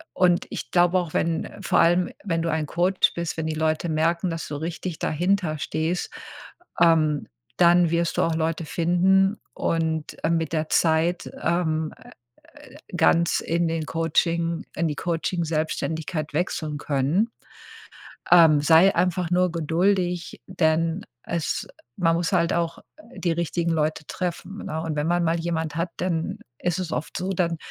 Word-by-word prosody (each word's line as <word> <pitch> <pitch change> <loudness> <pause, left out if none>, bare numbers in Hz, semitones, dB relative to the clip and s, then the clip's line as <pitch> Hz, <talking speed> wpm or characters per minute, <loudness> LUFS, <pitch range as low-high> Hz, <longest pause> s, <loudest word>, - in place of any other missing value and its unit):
und 180 -1 +3
ich - - -5
glaube 175 +1 +3
auch, 170 -3 -5
wenn 165 -1 0
vor - - +2
allem 175 +2 +3
wenn 165 -5 -1
du 165 - -1
ein 155 -1 -1
Coach 180 +4 +2
bist, 170 -1 -3
wenn 160 - -2
die 160 - -2
Leute 160 +2 0
merken, 165 +3 +1
dass 165 -1 -4
du 145 - -5
richtig 165 +2 -5
dahinter 175 0 0
stehst, 160 +4 -2 0.7
ähm, 155 -3 +3 0.3
dann 175 -1 +5
wirst 170 0 0
du - - +3
auch 165 - +1
Leute 160 0 -1
finden 190 +5 +2
und, 160 -2 -2
äh, 160 - +2
mit 165 -1 -1
der 155 -1 -1
Zeit, 165 +2 +1
ähm, 160 -3 0 0.8
äh, - - -17 0.2
ganz 170 0 +3
in 170 +1 0
den 160 -1 -2
Coaching 165 +1 0
in 165 +1 0
die 150 - -2
Coaching-Selbstständigkeit 160 -1 -2
wechseln 155 -2 -2
können. 150 - 0 1.0
Ähm, 160 -4 +7
sei 165 +5 +5
einfach 180 0 +1
nur 180 0 +3
geduldig, 175 +2 0
denn 165 +1 0 0.2
es 170 -2 -2 0.3
man 165 -2 +2
muss 170 -1 -1
halt 170 - +2
auch 170 -1 -1 0.3
die 175 - -1
richtigen 170 0 -1
Leute 155 -1 -1
treffen, 180 +2 -4
ne? 160 +1 -3
Und 160 -2 -3
wenn 150 +1 0
man 175 0 +2
mal 165 0 +1
jemand 165 -2 -2
hat, 170 +1 -1
dann 170 -3 -2 0.2
ist 175 0 -1
es 180 -3 -4
oft 155 - -4
so, 185 +2 -3
dann 170 -3 0
165 Hz, 155 wpm, -24 LUFS, 160-175 Hz, 1.0 s, Ähm